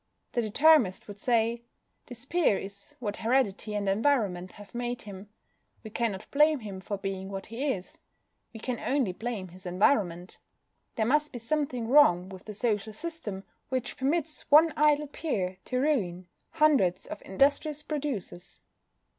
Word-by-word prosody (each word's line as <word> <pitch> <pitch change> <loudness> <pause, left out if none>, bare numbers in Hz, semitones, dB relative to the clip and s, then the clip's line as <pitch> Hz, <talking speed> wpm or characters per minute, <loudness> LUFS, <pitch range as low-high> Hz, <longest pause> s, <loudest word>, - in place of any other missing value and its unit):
The 240 - 0
Determinist 235 -2 +4
would 205 -1 -9
say: 235 0 +1 0.5
"This 245 0 -8
peer 325 - +2
is 200 +1 -8
what 205 -4 -4
heredity 225 -3 0
and 205 -1 -1
environment 195 -5 +1
have 205 -1 -14
made 240 0 -3
him. 200 0 -10 0.5
We 220 - -9
cannot 220 -4 -2
blame 300 -1 +4
him 200 -3 -7
for 205 +1 -4
being 195 -1 -4
what 195 -1 -5
he 235 +6 -4
is. 185 -6 -6 0.5
We 225 - -10
can 245 +1 -3
only 265 -8 0
blame 215 -3 -4
his 185 +2 -11
environment. 180 -2 +1 0.6
There 220 - +1
must 300 +5 +2
be 245 - -6
something 250 -1 -2
wrong 190 -10 +5
with 190 +2 -11
a - - -4
social 215 -1 -1
system 220 - -5 0.3
which 255 -2 -2
permits 305 +3 -1
one 310 +2 +7
idle 300 -1 +3
peer 195 - -3
to 255 - -2
ruin 200 - 0 0.3
hundreds 285 - +3
of - - -8
industrious 285 +7 +1
producers. 265 - -5
225 Hz, 155 wpm, -28 LUFS, 195-280 Hz, 0.6 s, one